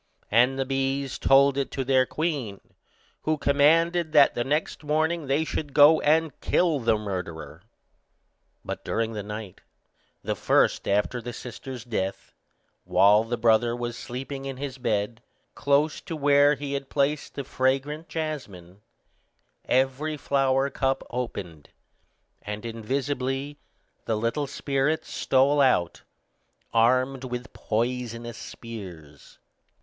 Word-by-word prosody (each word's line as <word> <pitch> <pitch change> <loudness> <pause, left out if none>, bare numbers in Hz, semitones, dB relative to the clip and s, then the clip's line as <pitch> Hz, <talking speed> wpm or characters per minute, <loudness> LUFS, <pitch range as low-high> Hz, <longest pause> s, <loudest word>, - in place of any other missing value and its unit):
And 125 +5 +4
the 135 - 0
bees 135 0 -2
told 140 0 +4
it 140 - -1
to 135 - -2
their 130 -1 +3
queen, 145 - -3 0.6
who 155 0 0
commanded 160 +4 +3
that 145 -2 +6
the 120 - -1
next 150 +4 -2
morning 155 +1 0
they 140 +4 +2
should 150 -2 -4
go 150 +2 +7
and 155 -1 +1
kill 165 -5 +2
the 115 -3 +2
murderer. 85 -6 -6 1.0
But - - -5
during 115 0 -1
the 105 - -4
night, 105 -2 -8 0.6
the - - -2
first - - +2
after 105 +5 0
the 120 +1 -6
sister's 125 +1 -8
death, 100 -5 -4 0.5
while 105 +2 +5
the 120 +1 -3
brother 115 +1 +3
was 120 -1 -4
sleeping 135 +4 -6
in 135 -1 -5
his 135 -1 -6
bed, 110 -1 -1 0.3
close 145 +2 +1
to 165 - -4
where 145 0 +4
he 140 0 -5
had 140 -1 -4
placed 145 +1 -1
the 140 - -3
fragrant 135 +5 -1
jasmine, 105 - -6 0.8
every 135 +4 0
flower 135 -1 +1
cup 135 0 0
opened, 95 -11 -5 0.7
and 105 +1 -6
invisibly 135 +4 -3 0.5
the 110 - 0
little 115 +7 -1
spirits 140 +2 -1
stole 140 +2 +3
out, 105 -11 +2 0.7
armed 130 +3 +2
with 125 0 -6
poisonous 120 0 -3
spears. 90 -11 -10
130 Hz, 125 wpm, -26 LUFS, 115-145 Hz, 1.0 s, go